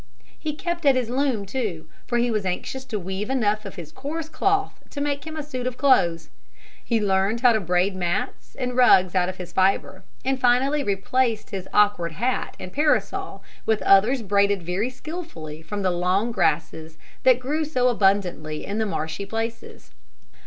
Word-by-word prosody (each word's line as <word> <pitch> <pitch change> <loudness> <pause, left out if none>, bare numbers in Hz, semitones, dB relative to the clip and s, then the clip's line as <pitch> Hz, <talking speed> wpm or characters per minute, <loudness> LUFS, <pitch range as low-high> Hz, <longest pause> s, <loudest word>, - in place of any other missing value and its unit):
He 305 -1 -3
kept 345 +1 -3
at 275 - +6
his 245 -2 -1
loom 255 -6 0
too, 195 -8 -3 0.2
for 240 - 0
he 240 0 +1
was 215 -2 0
anxious 190 +8 -3
to 230 -5 -3
weave 190 +3 -4
enough 215 -5 +1
of 195 - -7
his 160 -3 -9
coarse 310 - -5
cloth 395 +3 0
to 285 - -7
make 285 +1 -2
him 315 0 -6
a 305 - -3
suit 255 -4 -4
of 250 -1 -4
clothes. 170 - +3 0.5
He 230 -2 +1
learned 200 +2 +1
how 245 -2 +6
to 220 - +2
braid 180 +1 +1
mats 175 0 -3
and 250 -2 -3
rugs 190 -8 +5
out 180 -1 +2
of 185 - -6
his 180 -1 -8
fibre, 190 0 +1 0.2
and 265 0 0
finally 265 +4 +3
replaced 220 +3 0
his 190 -2 -5
awkward 205 -5 +3
hat 245 +9 -2
and 180 - -8
parasol 300 +1 0 0.2
with 220 -1 +1
others 225 +6 +4
braided 200 -1 +2
very 185 +8 -1
skillfully 255 - -8
from 200 +5 -5
the 185 - +2
long 185 +6 +1
grasses 160 -5 -1 0.2
that 255 -1 +5
grew 295 +5 -1
so 255 -5 +1
abundantly 195 -9 +1
in 205 +2 -3
the 220 - 0
marshy 160 +1 -3
places. 225 +2 -5
215 Hz, 180 wpm, -24 LUFS, 185-255 Hz, 0.5 s, at